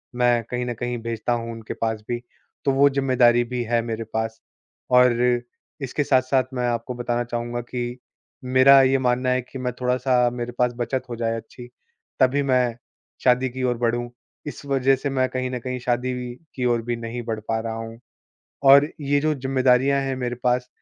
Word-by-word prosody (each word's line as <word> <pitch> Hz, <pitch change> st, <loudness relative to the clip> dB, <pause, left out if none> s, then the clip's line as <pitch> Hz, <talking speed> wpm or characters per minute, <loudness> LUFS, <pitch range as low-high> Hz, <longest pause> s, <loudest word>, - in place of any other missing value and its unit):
मैं 120 Hz, -1 st, +2 dB
कहीं 125 Hz, 0 st, -2 dB
न 120 Hz, -, -2 dB
कहीं 120 Hz, +1 st, -3 dB
भेजता 115 Hz, 0 st, -2 dB
हूँ 115 Hz, -1 st, -3 dB
उनके 115 Hz, -1 st, -7 dB
पास 110 Hz, -1 st, -2 dB
भी, 120 Hz, 0 st, -1 dB, 0.5 s
तो 140 Hz, -, +4 dB
वो 140 Hz, +1 st, +5 dB
जिम्मेदारी 130 Hz, -3 st, +3 dB
भी 125 Hz, +1 st, -4 dB
है 120 Hz, 0 st, +1 dB
मेरे 115 Hz, -1 st, -4 dB
पास। 110 Hz, 0 st, -2 dB, 0.5 s
और 125 Hz, -1 st, +5 dB, 0.6 s
इसके 135 Hz, +2 st, -1 dB
साथ-साथ 130 Hz, -1 st, +2 dB
मैं 125 Hz, -1 st, -1 dB
आपको 120 Hz, +1 st, -2 dB
बताना 120 Hz, 0 st, -1 dB
चाहूँगा 120 Hz, 0 st, -4 dB
कि 120 Hz, 0 st, -5 dB, 0.4 s
मेरा 130 Hz, +2 st, +6 dB
ये 135 Hz, 0 st, +4 dB
मानना 125 Hz, 0 st, +1 dB
है 130 Hz, 0 st, +2 dB
कि 130 Hz, +2 st, -10 dB
मैं 125 Hz, -1 st, -2 dB
थोड़ा-सा 125 Hz, 0 st, +2 dB
मेरे 120 Hz, 0 st, -4 dB
पास 125 Hz, 0 st, +2 dB
बचत 125 Hz, +2 st, -2 dB
हो 120 Hz, -, -4 dB
जाए 115 Hz, -1 st, -1 dB
अच्छी 120 Hz, +2 st, -11 dB, 0.5 s
तभी 130 Hz, +2 st, +3 dB
मैं 125 Hz, -3 st, +1 dB, 0.5 s
शादी 125 Hz, +1 st, +3 dB
की 130 Hz, +1 st, -5 dB
ओर 125 Hz, -1 st, +1 dB
बढ़ूँ, 120 Hz, 0 st, -1 dB, 0.4 s
इस 145 Hz, -, -7 dB
वजह 135 Hz, -1 st, +3 dB
से 135 Hz, +2 st, -3 dB
मैं 130 Hz, -1 st, +1 dB
कहीं 130 Hz, 0 st, -2 dB
न 125 Hz, -, -3 dB
कहीं 125 Hz, +1 st, -4 dB
शादी 125 Hz, +1 st, -1 dB
भी 125 Hz, -1 st, -5 dB, 0.2 s
कि 125 Hz, -, -2 dB
ओर 120 Hz, -1 st, +2 dB
भी 120 Hz, +1 st, -2 dB
नहीं 115 Hz, +1 st, -5 dB
बढ़ 110 Hz, -2 st, -3 dB
पा 110 Hz, 0 st, 0 dB
रहा 110 Hz, 0 st, -4 dB
हूँ। 115 Hz, +1 st, -7 dB, 0.6 s
और 140 Hz, +2 st, +7 dB
ये 145 Hz, 0 st, +1 dB
जो 155 Hz, +1 st, +1 dB
जिम्मेदारियाँ 130 Hz, 0 st, +2 dB
हैं 135 Hz, -1 st, -2 dB
मेरे 125 Hz, -1 st, -2 dB
पास 125 Hz, 0 st, +1 dB
125 Hz, 195 wpm, -23 LUFS, 120-130 Hz, 0.6 s, और